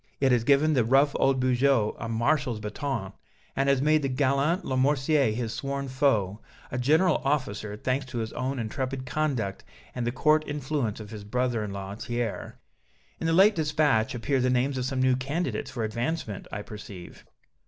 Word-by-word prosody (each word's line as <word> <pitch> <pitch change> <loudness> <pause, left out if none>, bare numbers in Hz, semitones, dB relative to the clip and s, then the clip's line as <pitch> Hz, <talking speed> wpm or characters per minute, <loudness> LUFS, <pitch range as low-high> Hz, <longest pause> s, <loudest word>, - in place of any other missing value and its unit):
It 135 -1 +3
has 120 -2 +3
given 145 +5 +4
the 125 -5 +3
rough 135 +5 +4
old 135 -1 +3
Bugeaud 130 -3 +2
a 115 - -4
Marshal's 120 +1 0
bâton, 105 -1 -4 0.4
and 135 +1 +1
has 135 -1 +3
made 155 +1 +4
the 135 - -1
gallant 140 +6 +1
Lamoricière, 135 0 +2
his 115 +1 -3
sworn 140 +2 -3
foe, 115 -7 +1 0.3
a 125 - -2
general 160 +7 +3
officer, 110 -7 -1
thanks 130 +4 -1
to 130 -1 -6
his 110 -1 -3
own 130 +1 -2
intrepid 130 +3 -3
conduct 125 -7 -2 0.3
and 120 -1 -3
the - - +1
court 155 +4 +3
influence 145 -6 -2
of 105 -1 -9
his 105 -2 -7
brother 120 +1 -1
in 105 - -5
law, 100 0 -6
Thiers." 120 +1 -4 0.7
"In 165 - -2
the - - +2
late 195 +5 +6
dispatch 150 - +1
appear 130 +3 0
the 125 0 +2
names 130 +2 +1
of 125 - -2
some 130 -1 -1
new 130 -1 +4
candidates 140 +7 -2
for 120 -3 -4
advancement, 115 - -3
I 105 - -5
perceive." 100 -4 -10
130 Hz, 180 wpm, -27 LUFS, 115-140 Hz, 0.7 s, late